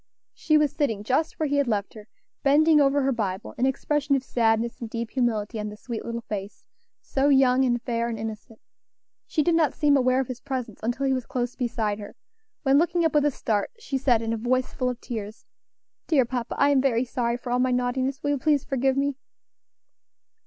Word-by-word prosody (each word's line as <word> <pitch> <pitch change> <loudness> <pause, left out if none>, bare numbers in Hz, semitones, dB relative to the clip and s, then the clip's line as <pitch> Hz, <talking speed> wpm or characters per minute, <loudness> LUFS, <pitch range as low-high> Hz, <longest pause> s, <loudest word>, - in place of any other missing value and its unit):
She 310 - +2
was 300 -2 +2
sitting 225 -9 -1
just 270 +8 0
where 315 - +1
he 285 -1 0
had 280 -2 +2
left 205 -3 -1
her, 215 -1 -12 0.3
bending 300 +2 +5
over 280 0 +3
her 270 - +2
Bible, 195 -6 -3
an 255 - +3
expression 280 +1 0
of 265 - -1
sadness 230 -1 0
and 230 - -5
deep 230 0 -4
humility 225 -3 -1
on 210 0 -3
the 210 - -10
sweet 230 0 -6
little 235 0 -4
face, 205 -2 -6 0.4
so 275 +1 +1
young 265 -2 +4
and 240 -1 +1
fair 235 -1 -2
and 230 - -4
innocent. 220 0 -7 0.7
She 305 - +1
did 345 - +2
not 330 -2 +2
seem 290 -1 +3
aware 255 -1 +3
of 265 - -1
his 255 -1 -7
presence 255 -6 -5
until 245 +5 -1
he 265 - +2
was 255 -2 -3
close 245 -1 -3
beside 220 -4 -2
her, 205 - -9 0.5
when, 275 0 +4
looking 345 0 +1
up 325 - +1
with 295 -1 +3
a - - +4
start, 220 -6 -1
she 285 -12 -3
said 245 -4 +2
in 225 0 -1
a - - -1
voice 255 +3 0
full 255 - -1
of 250 -1 -5
tears, 220 -2 -7 0.6
"Dear 280 -6 +3
papa, 245 -1 -4
I 280 - +4
am 275 -2 +4
very 255 -2 +1
sorry 235 -1 -1
for 245 0 -7
all 245 - +2
my 255 +1 +2
naughtiness; 255 +2 -1
will 290 - +1
you 285 - +1
please 295 -1 +2
forgive 270 0 0
me?" 280 -1 0
255 Hz, 215 wpm, -25 LUFS, 230-275 Hz, 0.7 s, bending